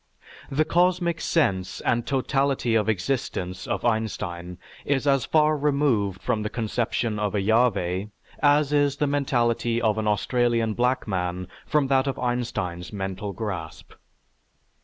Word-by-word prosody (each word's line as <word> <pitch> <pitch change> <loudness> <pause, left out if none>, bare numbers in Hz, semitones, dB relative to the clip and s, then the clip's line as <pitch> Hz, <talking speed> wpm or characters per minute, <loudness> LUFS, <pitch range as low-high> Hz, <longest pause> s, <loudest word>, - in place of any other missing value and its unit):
The 155 +3 +1
"cosmic 175 -1 +1
sense" 95 - 0
and 120 -1 0
"totality 135 -2 +1
of 110 -1 +2
existence" 95 -3 -2
of - - -2
Einstein 90 -6 -2 0.3
is 140 0 0
as 135 -4 +3
far 155 -1 +3
removed 140 -9 +1
from 115 -4 0
the 105 - -2
conception 115 -1 -1
of 105 -1 -1
a - - +2
Yahveh 100 -3 +1 0.3
as 145 0 +4
is 145 -1 +2
the 150 - +1
mentality 120 -5 +1
of 110 -2 +1
an 110 - -1
Australian 115 +1 +1
black 125 +3 0
man 90 -2 -2 0.2
from 150 -2 +2
that 135 0 +3
of 135 -1 -2
Einstein's 115 -8 -2
mental 95 0 -4
grasp. 95 -5 -6
120 Hz, 135 wpm, -25 LUFS, 100-140 Hz, 0.3 s, as